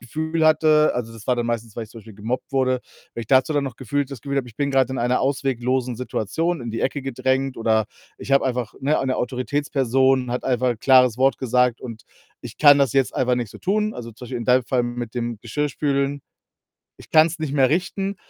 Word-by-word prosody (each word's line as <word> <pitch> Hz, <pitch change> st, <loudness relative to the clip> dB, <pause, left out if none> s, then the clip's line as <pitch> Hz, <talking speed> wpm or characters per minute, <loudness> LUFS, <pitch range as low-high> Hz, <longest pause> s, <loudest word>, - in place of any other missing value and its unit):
Gefühl 160 Hz, +6 st, -2 dB
hatte 155 Hz, -1 st, +4 dB
also, 115 Hz, -2 st, -4 dB
das 115 Hz, -1 st, -12 dB
war 125 Hz, -, +3 dB
dann 120 Hz, -1 st, -1 dB
meistens, 115 Hz, -2 st, -3 dB
weil 115 Hz, -, -4 dB
ich 105 Hz, -, -18 dB
zum 115 Hz, -, -11 dB
Beispiel 110 Hz, 0 st, -14 dB
gemobbt 115 Hz, +5 st, -4 dB
wurde, 130 Hz, -2 st, +1 dB, 0.3 s
wenn -, -, -4 dB
ich -, -, -11 dB
dazu 135 Hz, +3 st, +4 dB
dann 145 Hz, -, +1 dB
noch 130 Hz, -4 st, -6 dB
gefühlt 140 Hz, +2 st, -2 dB
das 135 Hz, -5 st, -8 dB
Gefühl 140 Hz, +3 st, -4 dB
habe, 130 Hz, -3 st, -1 dB
ich 115 Hz, -, -16 dB
bin 140 Hz, -1 st, -1 dB
grad 135 Hz, -1 st, +2 dB
in 130 Hz, -, -3 dB
einer 125 Hz, +2 st, +1 dB
ausweglosen 130 Hz, -2 st, -1 dB
Situation, 135 Hz, -, -2 dB
in 120 Hz, -1 st, -5 dB
die 115 Hz, -, -3 dB
Ecke 135 Hz, +1 st, -1 dB
gedrängt 130 Hz, 0 st, -1 dB
oder 110 Hz, -1 st, +1 dB, 0.3 s
ich 140 Hz, -, -5 dB
habe 135 Hz, -, +4 dB
einfach 125 Hz, -3 st, -2 dB
ne, 145 Hz, +3 st, +1 dB
eine 130 Hz, -1 st, -1 dB
Autoritätsperson 130 Hz, -1 st, 0 dB
hat 125 Hz, -, -3 dB
einfach 130 Hz, -1 st, +1 dB
'n 120 Hz, -, -4 dB
klares 125 Hz, -3 st, +5 dB
Wort 135 Hz, +1 st, +3 dB
gesagt, 125 Hz, -1 st, +1 dB
und 115 Hz, -3 st, -8 dB, 0.4 s
ich -, -, -10 dB
kann 145 Hz, -2 st, +7 dB
das 135 Hz, -5 st, +2 dB
jetzt 135 Hz, -2 st, +1 dB
einfach 125 Hz, -1 st, +1 dB
nicht 120 Hz, -4 st, -3 dB
so -, -, -12 dB
tun 210 Hz, +3 st, 0 dB
also, 115 Hz, -1 st, -7 dB
zum 125 Hz, +3 st, -11 dB
Beispiel 125 Hz, 0 st, -4 dB
in 120 Hz, -, -5 dB
deinem 125 Hz, +1 st, +3 dB
Fall 125 Hz, 0 st, 0 dB
mit 120 Hz, -1 st, -5 dB
dem 120 Hz, -2 st, -3 dB
Geschirrspülen, 140 Hz, +2 st, -1 dB, 0.8 s
ich -, -, -16 dB
kann's 160 Hz, +2 st, +4 dB
nicht 155 Hz, -3 st, -3 dB
mehr 135 Hz, -3 st, +3 dB
richten, 190 Hz, +5 st, -1 dB
130 Hz, 225 wpm, -22 LUFS, 120-140 Hz, 0.8 s, kann